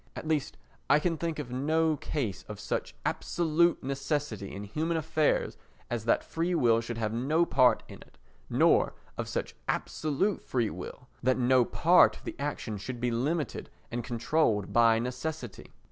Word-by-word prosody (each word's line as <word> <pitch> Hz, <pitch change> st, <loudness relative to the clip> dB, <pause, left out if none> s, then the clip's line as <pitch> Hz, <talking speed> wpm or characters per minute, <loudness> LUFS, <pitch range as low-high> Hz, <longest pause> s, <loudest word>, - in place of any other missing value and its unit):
At -, -, -6 dB
least 155 Hz, -2 st, -1 dB, 0.3 s
I -, -, +7 dB
can 165 Hz, +2 st, 0 dB
think 165 Hz, 0 st, -3 dB
of 140 Hz, -5 st, -5 dB
no 155 Hz, +5 st, +1 dB
case 115 Hz, -12 st, -3 dB
of 105 Hz, -1 st, -7 dB
such -, -, -3 dB
absolute 170 Hz, 0 st, +1 dB
necessity 135 Hz, -6 st, -2 dB
in 100 Hz, -, -6 dB
human 160 Hz, +11 st, -1 dB
affairs 160 Hz, -1 st, +1 dB, 0.3 s
as 115 Hz, -2 st, -2 dB
that 115 Hz, -, +2 dB
free 170 Hz, +2 st, -1 dB
will 115 Hz, -6 st, +4 dB
should 115 Hz, 0 st, -5 dB
have 110 Hz, -1 st, -1 dB
no 150 Hz, +8 st, +2 dB
part 125 Hz, -6 st, +4 dB
in -, -, -11 dB
it, -, -, -18 dB, 0.3 s
nor -, -, +3 dB, 0.2 s
of -, -, -4 dB
such -, -, -3 dB
absolute 155 Hz, +7 st, -1 dB
free 120 Hz, -4 st, 0 dB
will 90 Hz, +7 st, -8 dB
that 130 Hz, 0 st, +2 dB
no 130 Hz, 0 st, +4 dB
part 175 Hz, +8 st, +5 dB
of -, -, -17 dB
the -, -, -6 dB
action 130 Hz, -7 st, -3 dB
should 120 Hz, +5 st, -6 dB
be 125 Hz, 0 st, 0 dB
limited 145 Hz, +5 st, -2 dB, 0.2 s
and 120 Hz, 0 st, -3 dB
controlled 115 Hz, -3 st, 0 dB
by 115 Hz, -1 st, +5 dB
necessity. 125 Hz, +1 st, -5 dB
130 Hz, 165 wpm, -29 LUFS, 115-160 Hz, 0.3 s, I